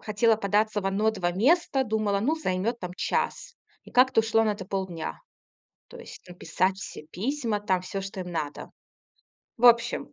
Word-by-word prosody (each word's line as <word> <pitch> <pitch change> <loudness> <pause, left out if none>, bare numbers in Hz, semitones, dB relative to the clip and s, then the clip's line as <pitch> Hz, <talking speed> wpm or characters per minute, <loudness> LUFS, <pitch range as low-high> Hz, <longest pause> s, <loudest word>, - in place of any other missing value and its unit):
хотела 220 +2 +2
податься 210 0 0
в 195 - -4
1-2 195 -2 0
места, 270 - +2
думала, 215 -2 0
ну, 280 +10 +1
займёт 230 -4 -2
там 180 - -5
час. - - -2 0.3
И - - -15
как-то 255 -1 +4
ушло 225 0 +3
на 220 - +2
это 200 - -8
полдня. 185 -4 -4 0.7
То 485 - -12
есть 475 - -11
написать 185 +2 -1
все 170 -5 -9
письма, 230 - -2
там 190 -3 0
всё, 195 +2 -5
что 195 0 -7
им 180 -1 -6
надо. 150 -3 -4 0.9
В 240 - -3
общем, 235 -1 +4
210 Hz, 165 wpm, -26 LUFS, 190-235 Hz, 0.9 s, как-то